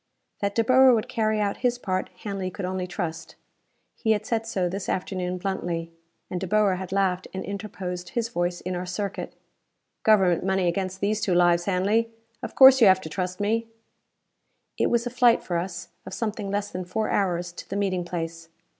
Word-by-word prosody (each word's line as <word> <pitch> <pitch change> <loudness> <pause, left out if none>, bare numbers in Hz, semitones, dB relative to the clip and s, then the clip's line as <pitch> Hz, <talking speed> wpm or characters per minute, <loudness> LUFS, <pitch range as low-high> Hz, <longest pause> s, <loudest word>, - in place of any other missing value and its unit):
That 200 0 -1
De 230 - +3
Boer 255 +1 +6
would 220 - -1
carry 215 -1 0
out 200 -1 0
his 245 -1 0
part, 185 -5 -2
Hanley 195 -3 -3
could 185 +1 -5
only 185 0 -3
trust. 175 -3 -5 0.6
He 220 - +1
had 210 - -3
said 225 -1 -1
so 190 -5 0
this 190 +2 -4
afternoon 185 -1 -2
bluntly. 175 -3 -3 0.4
And 180 - -4
De 190 - -3
Boer 205 -2 +3
had 185 0 -6
laughed 190 -2 0
and 190 - -4
interposed 195 -3 -5
his 235 -1 -1
voice 175 -5 -2
in 185 0 -3
our 180 +1 -4
circuit. 200 +2 -4 0.7
"Government 190 -6 +4
money 190 -1 +1
against 185 +2 -2
these 210 +2 0
two 185 -4 +1
lives, 175 -1 +4
Hanley! 205 +4 +1 0.3
Of - - -6
course 265 -1 +9
you 220 - +8
have 190 0 +5
to 160 - -7
trust 185 +2 -3
me!" 225 +3 0 1.1
It - - +1
was 235 0 +1
a 245 - -3
flight, 245 -1 +4
for 175 - -3
us, 175 0 -6
of - - -7
something 215 -3 -3
less 205 +1 -2
than 185 - -4
four 215 +5 -2
hours 175 -3 0
to 170 - -11
the 195 - -3
meeting 190 -3 0
place. 165 -1 -5
190 Hz, 195 wpm, -25 LUFS, 180-215 Hz, 1.1 s, course